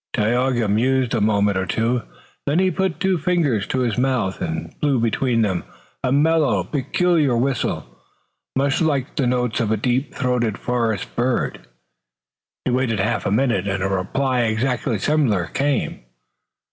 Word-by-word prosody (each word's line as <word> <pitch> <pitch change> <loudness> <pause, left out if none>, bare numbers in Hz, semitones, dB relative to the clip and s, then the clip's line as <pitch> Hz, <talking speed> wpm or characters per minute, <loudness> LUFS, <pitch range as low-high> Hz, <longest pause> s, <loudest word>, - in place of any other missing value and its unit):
Tayoga 120 +1 +1
mused 125 +4 +1
a 115 - +1
moment 100 -2 +2
or 95 - -2
two. 115 +4 0 0.5
Then 145 +3 +2
he 185 0 +3
put 190 0 -1
two 190 -2 +1
fingers 150 - +1
to 130 - -1
his 120 -2 0
mouth 125 -7 0
and 80 0 -4
blew 140 -4 +2
between 115 +1 +1
them 95 -4 -1 0.4
a 125 - +1
mellow, 145 - +3
peculiar 145 - +1
whistle, 130 - -1 0.7
much 135 +2 +1
like 145 -4 0
the 135 -5 +1
notes 125 +1 0
of 115 -3 0
a 110 - +2
deep 125 +5 -1
throated 120 -4 0
forest 115 -5 -2
bird. 120 - -1 1.0
He - - +1
waited 125 -3 +1
half 110 +5 0
a - - 0
minute 110 -4 +1
and 95 -1 -1
a - - +1
reply 125 +7 0
exactly 115 +1 0
similar 115 - +1
came. 140 - -1
125 Hz, 155 wpm, -21 LUFS, 110-135 Hz, 1.0 s, he